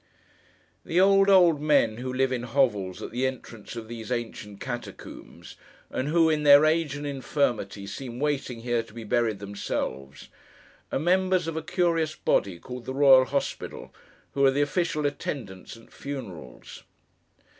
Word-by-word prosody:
The 170 - 0
old, 195 +1 +5
old 175 -6 +5
men 145 -8 +3
who 130 +1 -4
live 130 +1 +1
in 125 -2 -1
hovels 115 -7 0
at - - -6
the 125 +3 0
entrance 120 -4 -8
of 115 -1 -7
these 115 0 -8
ancient 110 -4 -5
catacombs, 120 -2 -8 0.3
and 130 - -2
who, 165 +1 +4
in 155 -1 +1
their 145 0 +7
age 155 -2 +1
and 145 0 -6
infirmity, 125 -8 -2
seem 120 +4 -7
waiting 140 -5 -2
here, 120 -1 0
to 115 -1 -16
be 115 - -7
buried 110 -1 0
themselves, 70 -9 -5 0.6
are - - 0
members 185 +3 +2
of 165 - -3
a 160 - -2
curious 165 -3 0
body, 95 -3 0
called 125 +6 -9
the 130 - -5
Royal 135 -2 +7
Hospital, 140 +1 -4 0.4
who 140 - 0
are 135 - +7
the 140 +2 +2
official 155 -1 -1
attendants 115 -9 -5
at 115 - -19
funerals. 100 - -8
130 Hz, 155 wpm, -26 LUFS, 115-150 Hz, 0.6 s, their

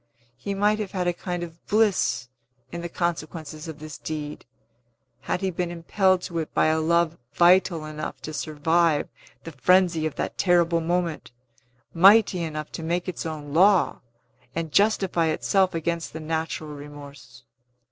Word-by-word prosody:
He 200 +10 -5
might 210 +2 +2
have 210 -3 -4
had 185 -2 -1
a 175 - +1
kind 175 0 -4
of 165 -1 -10
bliss 195 - +2 0.4
in 170 - -5
the 170 - -5
consequences 160 -2 -4
of 160 -2 -7
this 155 -2 -9
deed, 150 -1 -6 0.7
had 180 - -3
he 190 -1 0
been 175 0 -2
impelled 180 +2 +1
to 170 -1 -3
it 160 - -4
by - - +4
a 160 0 +2
love 170 0 +1
vital 175 -2 +4
enough 155 0 -6
to 155 - -6
survive 155 +1 +1 0.3
the 165 - -7
frenzy 170 +2 +3
of 155 - -7
that - - -4
terrible 170 -2 +3
moment, 170 -1 -2 0.6
mighty 195 +1 +6
enough 155 -2 -5
to - - -6
make 170 +3 -2
its 175 -2 -4
own 150 -2 -6
law, 190 +3 +4 0.5
and 165 -2 -3
justify 195 -4 +2
itself 185 +3 +1
against 165 0 -2
the 160 - -6
natural 160 -1 -3
remorse. 140 -3 -12
165 Hz, 155 wpm, -25 LUFS, 155-180 Hz, 0.7 s, mighty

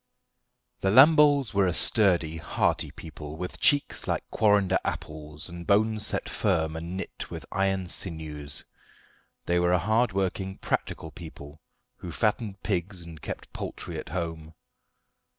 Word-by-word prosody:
The 95 - +1
Lamboles 145 +2 +6
were 100 -1 +3
a 90 - +1
sturdy, 90 -7 +4
hearty 80 - 0
people, 75 -1 -9
with 90 +1 -6
cheeks 145 -1 +2
like - - -1
quarrender 100 -3 +3
apples, 75 0 -5
and 85 -1 -9
bones 105 +1 +3
set - - -1
firm 80 -5 0
and 85 +3 -5
knit 95 - -6
with - - -7
iron 95 -1 0
sinews. 75 -5 -2 0.8
They 85 0 +2
were 90 0 +2
a - - +5
hard 110 +6 +2
working, 95 0 -2
practical 80 - -3
people 80 -2 -11 0.4
who 85 - -7
fattened 105 +2 -1
pigs 95 -2 -2
and 80 -3 -11
kept - - -7
poultry - - -5
at - - -8
home. 80 -2 -5
90 Hz, 140 wpm, -27 LUFS, 80-100 Hz, 0.8 s, Lamboles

